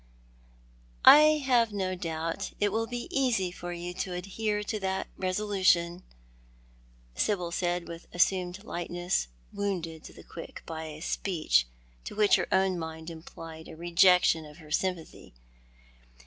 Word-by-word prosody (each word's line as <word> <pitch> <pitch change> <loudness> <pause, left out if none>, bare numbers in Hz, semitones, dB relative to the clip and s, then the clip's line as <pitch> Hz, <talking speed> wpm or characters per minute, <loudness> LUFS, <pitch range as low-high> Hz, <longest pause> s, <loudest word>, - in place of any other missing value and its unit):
" - - -30 0.3
I 305 0 +8
have 240 -4 +3
no 190 -2 -2
doubt 165 +2 -4
it 205 -1 +2
will 225 +2 0
be 245 0 -5
easy 235 -9 +1
for 175 0 -7
you 175 0 -5
to 185 0 -4
adhere 210 +4 -2
to 215 +1 -3
that 190 -1 -1
resolution," 185 -3 +1 1.1
Sybil 180 - 0
said, 175 0 -1
with 170 0 -8
an - - -30
assumed 180 +2 +1
lightness, 175 - -2 0.3
wounded 170 -6 -3
to - - -10
the - - -13
quick - - -10
by 160 -1 -5
a 155 0 -8
speech 155 - +1 0.4
which 210 -1 +2
to - - +6
her - - -3
own 190 -1 +2
mind 160 0 -6
implied 160 0 -10
a - - -10
rejection 175 0 +4
of 150 0 -13
her 155 -3 -14
sympathy. 175 - -3
180 Hz, 150 wpm, -29 LUFS, 165-200 Hz, 1.1 s, I